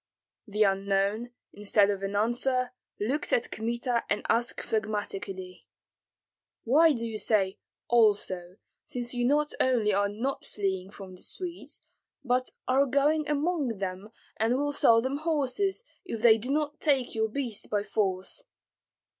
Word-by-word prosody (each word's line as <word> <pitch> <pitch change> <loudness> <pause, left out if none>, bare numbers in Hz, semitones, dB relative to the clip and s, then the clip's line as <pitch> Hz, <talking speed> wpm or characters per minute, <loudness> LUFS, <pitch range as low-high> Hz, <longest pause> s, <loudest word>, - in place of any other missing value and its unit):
The 210 +1 +2
unknown, 200 +3 +1 0.2
instead 205 0 +3
of 195 -1 -4
an 195 +1 -3
answer, 245 +4 +1 0.3
looked 260 +9 -1
at 240 - +1
Kmita 235 +2 -1
and 210 - -1
asked 235 +1 +1
phlegmatically, 205 -4 -4 1.0
"Why 310 +7 +5
do 230 -3 -3
you 220 -2 -4
say 195 -4 +1 0.3
also, 200 -6 +2 0.3
since 240 0 -4
you 245 -1 0
not 295 +3 +2
only 235 -5 +2
are 200 +1 +2
not 240 +7 -3
fleeing 190 -2 -3
from 195 -2 -10
the - - -14
Swedes, 360 -2 -7 0.4
but 255 0 +1 0.2
are 270 +2 +3
going 295 +3 +2
among 295 - 0
them 190 +1 -5 0.3
and 225 +3 +2
will 290 +2 0
sell 230 -4 +5
them 265 +2 -1
horses, 320 - 0 0.2
if 230 - -6
they 225 -2 +7
do 245 +5 -4
not 295 +1 -1
take 275 -5 +1
your 220 0 0
beasts 230 -3 -4
by 205 -1 0
force?" 200 - -2
230 Hz, 145 wpm, -28 LUFS, 205-270 Hz, 1.0 s, they